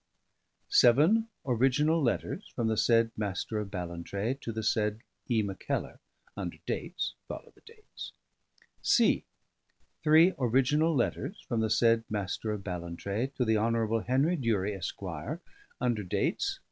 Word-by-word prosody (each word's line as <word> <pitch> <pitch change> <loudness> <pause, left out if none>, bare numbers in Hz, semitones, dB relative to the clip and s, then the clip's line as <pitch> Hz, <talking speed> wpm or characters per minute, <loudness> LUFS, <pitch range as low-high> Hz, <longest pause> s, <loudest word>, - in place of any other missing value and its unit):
Seven 160 - +5 0.2
original 135 +6 +2
letters 140 - -1
from 120 - -1
the 110 - +1
said 115 +1 +3
M^r 105 +1 -2
of 100 - -6
Ballantrae 90 +4 -3
to 115 - -4
the 110 0 -4
said 105 0 0 0.3
E. 115 -4 +2
Mackellar, 100 -2 -3 0.4
under - - -5
dates... - - -3
(follow - - -8
the - - -24
dates). 440 -1 -10 0.7
C. - - +3 0.8
Three 160 +4 +6
original 140 +6 +3
letters 145 - -2
from 115 - -1
the 110 0 +1
said 115 +1 +4
M^r 105 +1 -2
of 100 - -8
Ballantrae 95 +7 -3
to 125 - +1
the 110 -1 +3
Hon. 115 0 +1
Henry 135 +8 +2
Durie, 105 -6 0
Esq., 95 -3 -5 0.8
under 120 -4 0
dates 90 - -1
115 Hz, 135 wpm, -30 LUFS, 105-135 Hz, 0.8 s, Three